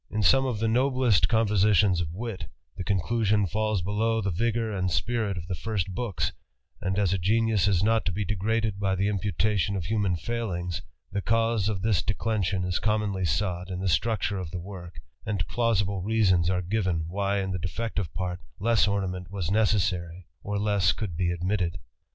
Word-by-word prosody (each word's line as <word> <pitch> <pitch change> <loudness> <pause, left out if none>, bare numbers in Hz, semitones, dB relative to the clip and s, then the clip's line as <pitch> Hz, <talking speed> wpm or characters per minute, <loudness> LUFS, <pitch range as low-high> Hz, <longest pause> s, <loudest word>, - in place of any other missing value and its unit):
In 110 -1 -1
some 135 +8 +5
of 125 -4 -1
the 110 +2 0
noblest 125 -3 +3
compositions 105 -4 +3
of 80 -2 -3
wit, 100 -4 -5 0.3
the 95 - -4
conclusion 105 +2 +1
falls 110 0 0
below 110 +4 +1
the 100 -3 -1
vigoiu: 110 +3 0
and 95 -1 0
spirit 110 +1 -1
of 85 - -5
the 90 - -4
first 95 -1 -2
books; 105 -2 -2 0.5
and 95 +1 -1
as 100 -3 +2
a 95 - 0
genius 110 +2 +2
is 95 -2 +2
not 110 +1 +3
to 95 - +1
be 100 +3 -2
degraded 105 +1 -1
by 95 -1 +1
the 95 +2 +1
imputation 100 0 0
of 90 -4 -3
human 100 -2 +1
failings, 90 -5 -3 0.3
the 100 - -1
cause 115 -1 +1
of 100 -3 -3
this 105 -6 +2
declension 100 -2 -1
is 90 0 -1
commonly 105 -3 0
sought 90 0 -1
in 90 -1 -4
the 95 - -1
structure 105 +2 +1
of 90 -4 -5
the 90 +2 -5
work, 90 -1 -9 0.3
and 100 -8 -2
Pbusible 100 -5 0
reasons 95 -5 +3
are 90 -1 0
given 90 -4 0
why 100 +3 0
in 95 -1 -1
the 90 - -2
defective 100 -1 -3
part 90 -1 -3 0.2
less 115 +1 +3
>nmment 95 -3 -2
was 95 -3 -3
necessary, 95 -5 +1 0.2
or 105 0 -3
less 100 -3 +2
could 100 -7 -4
be 85 +1 0
admitted. 90 0 -1
100 Hz, 185 wpm, -27 LUFS, 90-110 Hz, 0.5 s, some